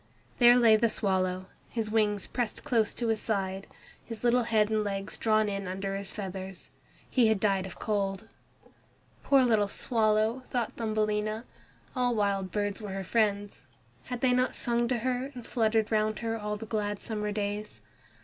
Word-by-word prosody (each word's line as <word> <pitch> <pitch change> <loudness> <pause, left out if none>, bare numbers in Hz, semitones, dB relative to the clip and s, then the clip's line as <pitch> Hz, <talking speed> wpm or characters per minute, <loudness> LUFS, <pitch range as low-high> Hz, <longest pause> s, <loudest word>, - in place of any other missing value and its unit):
There 240 0 +8
lay 225 -3 +6
the 230 +1 +2
swallow, 185 -3 0 0.2
his 225 -2 -3
wings 210 -2 +1
pressed 240 -4 -3
close 235 -7 +1
to 235 -2 -1
his 220 -1 0
side 195 -2 -2 0.4
His 230 -1 -8
little 245 +1 +4
head 215 -2 +2
and 215 -1 +2
legs 195 -1 -3
drawn 215 -1 +2
in 200 -1 -3
under 195 +1 -3
his 195 0 -3
feathers. 190 -2 -7 0.4
He 245 -4 +3
had 220 -2 +2
died 195 -2 +1
of 185 - -11
cold. 200 -1 -2 1.0
"Poor 275 -2 +5
little 220 -4 +3
swallow!" 220 +2 +1
thought 240 -3 -1
Thumbelina. 215 0 -1 0.5
All 245 -1 +1
wild 200 -3 0
birds 205 +2 -2
were 205 -2 -5
her 195 0 -3
friends. 205 - 0 0.4
Had 245 -1 -5
they 255 -1 +3
not 255 0 +1
sung 235 0 0
to 250 0 0
her 255 +3 -2
and 245 -2 -8
fluttered 220 -2 +1
round 215 0 +1
her 225 0 0
all 210 -1 -3
the 225 - -7
long - - -20
glad 205 -2 -1
summer 210 -2 -3
days? 205 0 -3
215 Hz, 175 wpm, -29 LUFS, 200-230 Hz, 1.0 s, There